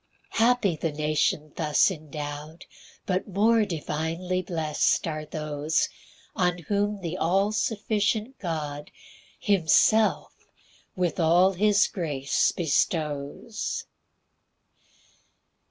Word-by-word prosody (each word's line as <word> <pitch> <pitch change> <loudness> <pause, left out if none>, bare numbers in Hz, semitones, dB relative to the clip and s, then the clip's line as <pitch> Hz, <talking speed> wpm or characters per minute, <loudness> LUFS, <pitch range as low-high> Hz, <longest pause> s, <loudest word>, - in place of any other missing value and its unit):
3 225 - +3
Happy 235 -8 +2
the 160 +1 -2
nation 150 0 0
thus 155 +3 +3
endow'd, 150 0 -7 0.4
But 185 +2 -1
more 215 +3 +3
divinely 170 +1 -2
blest 160 -2 0
are 155 -1 -4
those 150 0 -1 0.5
On 180 -2 +1
whom 205 +3 -1
the 175 0 -4
all 195 +5 +2
sufficient 215 +3 -1
God 150 -5 -4 0.5
Himself 205 +1 +3 0.6
with 180 -1 -1
all 175 +3 +5
his 205 +2 +3
grace 145 -8 0
bestows. 150 +3 -2
170 Hz, 90 wpm, -26 LUFS, 155-200 Hz, 0.6 s, all